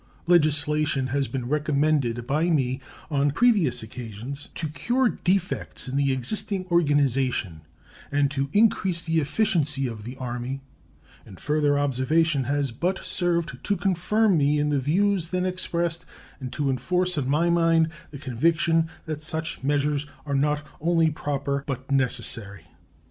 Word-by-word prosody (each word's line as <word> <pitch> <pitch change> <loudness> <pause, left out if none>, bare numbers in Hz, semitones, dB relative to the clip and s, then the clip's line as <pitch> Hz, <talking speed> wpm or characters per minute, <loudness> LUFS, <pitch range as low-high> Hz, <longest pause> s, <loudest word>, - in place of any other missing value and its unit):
Legislation 150 -4 +3
has 140 -2 +1
been 125 -3 -4
recommended 145 -4 +1
by 155 +6 +1
me 135 -4 0 0.3
on 145 0 +2
previous 165 - +2
occasions 120 +5 -7
to 160 - -3
cure 240 - +1
defects 185 -6 -1
in 130 - -4
the 140 -1 +2
existing 185 - -1
organization 135 - +1 0.5
and 140 -1 +2
to 140 -1 -2
increase 190 -5 +2
the 165 -1 +1
efficiency 150 -3 +1
of 115 -4 -5
the 125 +4 -8
Army, 125 +1 -4 0.6
and 95 - -13
further 150 -1 +1
observation 145 +2 +1
has 140 0 0
but 175 +11 -2
served 170 -7 0
to 205 -1 0
confirm 195 +2 +2
me 145 +1 +3
in 150 0 +1
the 145 -1 +1
views 175 +5 +1
then 185 0 -1
expressed 170 -2 -1 0.4
and 130 -2 -6
to 145 -3 0
enforce 180 +8 0
on 135 -3 -1
my 165 +4 +2
mind 165 -1 +3 0.2
the 145 - -9
conviction 165 +5 +1 0.2
that 155 -2 -4
such 160 +1 -4
measures 145 +1 0 0.2
are 140 - -3
not 150 +2 +1 0.2
only 165 -1 +3
proper, 140 -2 -2
but 135 0 -5
necessary. 115 -8 -1
145 Hz, 145 wpm, -25 LUFS, 135-170 Hz, 0.6 s, Legislation